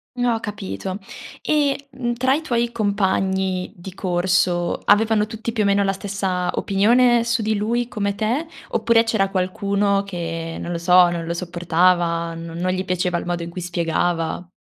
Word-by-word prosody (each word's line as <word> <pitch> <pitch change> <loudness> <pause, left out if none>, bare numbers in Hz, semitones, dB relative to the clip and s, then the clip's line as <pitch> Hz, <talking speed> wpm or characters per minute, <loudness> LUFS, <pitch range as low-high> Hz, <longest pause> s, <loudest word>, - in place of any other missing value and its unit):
Mhmm, 245 -1 -1
ho 225 - -1
capito. 190 - -5 0.4
E, 285 -2 0
mhmm, 250 -2 -2
tra 260 +3 +2
i 300 - 0
tuoi 235 -5 0
compagni 190 -3 0
di 185 +1 -10
corso 175 -1 +1
avevano 215 0 +4
tutti, 225 +1 -5
più 225 -2 -1
o - - +1
meno, 200 0 +3
la 195 0 +1
stessa 190 -2 -2
opinione 235 +4 +3
su 235 0 0
di 215 0 +1
lui 235 +3 0
come 200 -3 -2
te, 240 +10 -1 0.2
oppure 230 -1 +3
c'era 220 -4 +1
qualcuno 200 +1 0
che, 165 -3 -5
non 175 - -5
lo 170 - -2
so, 180 +1 +6
non 170 -1 -3
lo 170 - -2
sopportava, 175 -1 +1
non 165 0 -7
non 185 - +2
gli 185 - -2
piaceva 180 -1 0
il - - -7
modo 175 -1 -2
in 170 - -6
cui 180 +1 -6
spiegava? 170 0 -1
195 Hz, 175 wpm, -21 LUFS, 175-220 Hz, 0.4 s, so